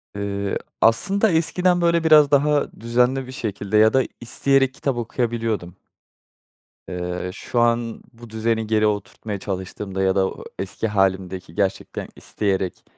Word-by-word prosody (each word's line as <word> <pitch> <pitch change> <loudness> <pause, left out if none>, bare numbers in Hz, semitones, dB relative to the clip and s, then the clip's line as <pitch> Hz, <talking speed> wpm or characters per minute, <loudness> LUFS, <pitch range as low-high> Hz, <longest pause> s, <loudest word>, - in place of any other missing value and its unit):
Eee, 100 -1 -2 0.2
aslında 195 - +3
eskiden, 175 +2 +2
böyle, 170 -1 +2
biraz 155 -3 +6
daha 145 0 +3
düzenli 125 +3 +1
bir - - -8
şekilde 105 -4 -2
ya 110 +1 +5
da 130 0 +4 0.2
isteyerek 135 +2 +2
kitap 135 -2 -2
okuyabiliyordum. 115 -6 -2 1.1
Eee, 90 0 -4
şu 120 +4 -3
an 120 -1 +1
bu 120 0 -13
düzeni 110 0 -1
geri 110 -1 +3
oturtmaya 105 0 -4
çalıştığımda 95 0 -4
ya 95 0 +2
da 95 -1 +3
o - - -10 0.2
eski 95 +3 -3
hâlimdeki 95 -4 -1
gerçekten 95 0 -2
isteyerek 95 -3 -2
110 Hz, 135 wpm, -22 LUFS, 95-130 Hz, 1.1 s, biraz